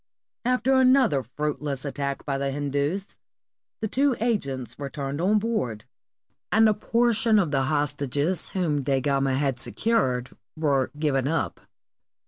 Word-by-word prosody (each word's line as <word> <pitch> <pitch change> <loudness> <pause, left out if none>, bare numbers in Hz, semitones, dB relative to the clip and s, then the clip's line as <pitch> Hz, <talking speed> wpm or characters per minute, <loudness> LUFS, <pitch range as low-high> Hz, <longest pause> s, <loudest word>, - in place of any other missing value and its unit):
After 255 +1 +2
another 255 - +4
fruitless 145 +2 -3
attack 140 0 -3
by 135 -2 -1
the 140 0 -1
Hindus, 145 +7 -2 0.6
the 220 - 0
two 270 +4 +2
agents 140 - -2
returned 140 +1 -4
on 205 +4 +3
board, 205 - -2 0.7
and 220 +1 +5
a 215 - +4
portion 230 0 +2
of 175 -7 +2
the 135 -2 +1
hostages 145 +3 0
whom 160 -6 0
Da 135 0 +1
Gama 135 0 +1
had 135 -2 0
secured 130 - 0 0.3
were 140 -4 +1
given 140 -3 +1
up. 165 +2 -1
145 Hz, 130 wpm, -25 LUFS, 135-215 Hz, 0.7 s, and